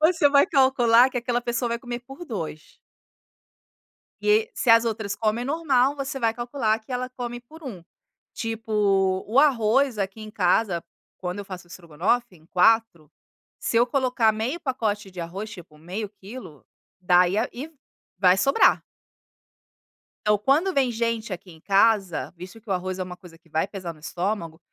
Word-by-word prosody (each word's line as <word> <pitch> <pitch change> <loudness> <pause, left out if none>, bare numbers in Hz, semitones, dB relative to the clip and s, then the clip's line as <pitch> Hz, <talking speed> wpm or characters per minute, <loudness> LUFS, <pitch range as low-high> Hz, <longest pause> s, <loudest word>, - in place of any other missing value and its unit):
você 315 -2 +4
vai 280 +2 +5
calcular 260 -5 +5
que 255 - -2
aquela 240 0 -1
pessoa 240 0 -1
vai 235 - -1
comer 240 0 -6
por 270 +7 -11
2. 165 - -7 1.4
E, 435 +2 +3
se 250 - -1
as 230 0 +7
outras 215 -3 -2
comem 225 +2 -1
normal, 280 -3 +2
você 275 -1 -4
vai 230 -2 +1
calcular 240 -2 -1
que 220 - -13
ela 255 0 -2
come 240 -1 -6
por 315 +7 -16
1. 205 - -8 0.5
Tipo, 210 -4 0
o 235 +6 +4
arroz 260 -2 +3
aqui 195 +2 -3
em 215 0 -9
casa, 185 -2 +1 0.3
quando 180 +2 -4
eu 200 - -6
faço 180 -2 -9
o - - -27
strogonoff 175 +9 -1
em 160 -3 -20
4. 180 -5 +2 0.5
Se 230 - 0
eu 235 - +5
colocar 250 -4 +2
meio 235 +10 -3
pacote 215 - -2
de 180 - -9
arroz 190 +6 -6
,tipo, 175 -7 -12
meio 190 +7 -5
quilo, 190 - -11 0.4
dá, 180 0 +5
e 190 +4 -1
aí 225 - 0
e 285 +6 -7 0.5
vai 185 -1 +5
sobrar. 275 +7 +4 1.4
Então, 210 0 +4
quando 300 - +2
vem 265 -3 +2
gente 230 -2 -2
aqui 180 0 -7
em 160 - -15
casa, 195 -2 +2
visto 180 +5 -10
que 225 - -17
o 195 - +2
arroz 185 +1 -3
é - - 0
uma 180 0 -8
coisa 175 -4 -15
que 170 0 -28
vai 160 +4 0
pesar 185 -4 -6
no 155 - -19
estômago. 170 0 -3
220 Hz, 175 wpm, -24 LUFS, 185-250 Hz, 1.4 s, as